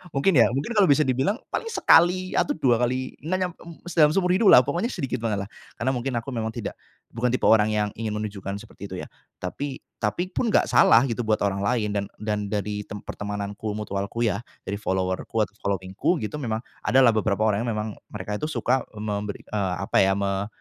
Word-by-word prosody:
mungkin 140 +8 +3
ya, 120 - +7
mungkin 140 - -2
kalau 205 -3 +5
bisa 150 +1 +5
dibilang 135 - +1 0.2
paling 460 - -2
sekali 180 - +4
atau 290 - +1
2 120 -3 +2
kali, 130 +1 -1
na 180 +4 -1
nyam 180 -1 -1 0.4
dalam 150 -3 +5
seumur 180 -2 +2
hidup 210 +2 +3
lah 125 - +9
pokoknya 170 - -1
sedikit 130 -2 -3
banget 105 -3 -1
lah, - - -15 0.3
karena 130 +3 +1
mungkin 130 +1 -2
aku 125 +4 -7
memang 115 -2 -2
tidak, - - -5 0.4
bukan 120 +2 -1
tipe 130 - -1
orang 110 -1 +5
yang 105 -1 +1
ingin 110 -1 -3
menunjukkan 100 -2 -4
seperti - - -10
itu - - -4
ya, - - -8 0.3
tapi 135 +9 -5 0.2
tapi 175 - -1
pun 245 - -1
gak - - +3
salah 115 +3 +6
gitu 120 0 -2
buat 110 - +2
orang 100 -1 0
lain 110 -1 +1
dan 100 - 0 0.2
dan 105 -1 -1
dari 105 0 -2
tem 105 - -6
pertemananku 105 +1 -4
mutualku 105 +2 -3
ya 105 -3 +1 0.2
dari 100 +1 -3
follower-ku, 95 +2 -1 0.2
following-ku 95 - -1
gitu 110 - -4
memang 110 -5 -2 0.2
adalah 130 -2 +6
beberapa 110 -1 0
orang 105 +4 -1
memang 105 -2 -2 0.2
mereka 105 0 -4
itu 150 - -2
suka 130 -4 +1
memberi, 105 -1 -4
eee, 95 -4 -2
apa 100 - 0
ya 95 0 +3
me 100 0 -1
110 Hz, 200 wpm, -25 LUFS, 105-135 Hz, 0.4 s, lah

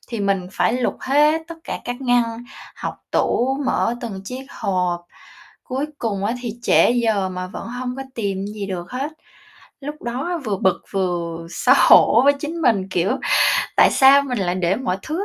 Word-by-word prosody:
thì 230 -4 -4
mình 195 -2 0
phải 180 +5 +1
lục 250 -1 -1
hết 300 +4 +3
tất 335 - -6
cả - - -4
các 245 +1 -5
ngăn, 245 -1 +3 0.5
hộc - - -4 0.2
tủ, 265 +3 +1
mở 235 - +1
từng 210 -6 -6
chiếc 260 +4 -7
hộp. 180 -4 -1 0.6
Cuối 265 +3 -3
cùng 200 -4 -2
á 230 +4 0
thì 230 -3 -4
trễ - - +4
giờ 220 -6 +1
mà 185 0 -5
vẫn 195 - -8
hông 250 +1 -5
có 270 - -4
tìm 195 -3 -2
gì 205 -1 -5
được 180 -2 -5
hết. 275 +5 -4 0.7
Lúc 295 +2 -7
đó 275 +9 -3
vừa 205 -3 -1
bực 190 0 +1
vừa 170 -3 -2
xấu - - +3
hổ 235 - +6
với 285 - +6
chính 330 +2 -4
mình, 200 -7 +2
kiểu: 190 +9 +1 0.6
"Tại - - +6
sao 275 +1 +6
mình 250 -4 -3
lại 180 -2 0
để 185 +1 0
mọi 210 -7 -2
thứ 340 +6 -3
230 Hz, 185 wpm, -21 LUFS, 190-265 Hz, 0.7 s, hổ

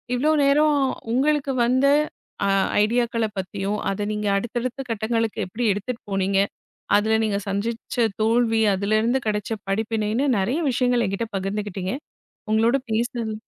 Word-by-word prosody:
இவ்வளவு 305 +4 +2
நேரம் 295 +1 +4 0.4
உங்களுக்கு 280 +2 +2
வந்த 255 +3 +2 0.6
அ - - +2 0.4
ஐடியாக்களைப் 230 -1 0
பத்தியும் 195 +2 -2
அதை 195 +1 -2
நீங்க 210 0 -2
அடுத்தடுத்த 240 +4 -3
கட்டங்களுக்கு 225 0 -1
எப்படி 220 +7 -4
எடுத்துட்டு 230 +4 -5
போனீங்க, 195 0 +1 0.6
அதுல 220 +1 +2
நீங்க 205 -2 0
சந்திச்ச 225 +4 -1 0.2
தோல்வி, 225 0 +2
அதுல 200 +3 +1
இருந்து 245 +4 +1
கிடைச்ச 210 0 -2 0.2
படிப்பினைன்னு 220 +4 0
நிறைய 235 - 0
விஷயங்களை 245 -1 +2
என்கிட்ட 195 +4 -2
பகிர்ந்துக்கிட்டீங்க. 195 -1 -3 0.6
உங்களோட 225 +4 +3 0.2
பேசுனது 230 -1 -1
225 Hz, 125 wpm, -23 LUFS, 205-245 Hz, 0.6 s, நேரம்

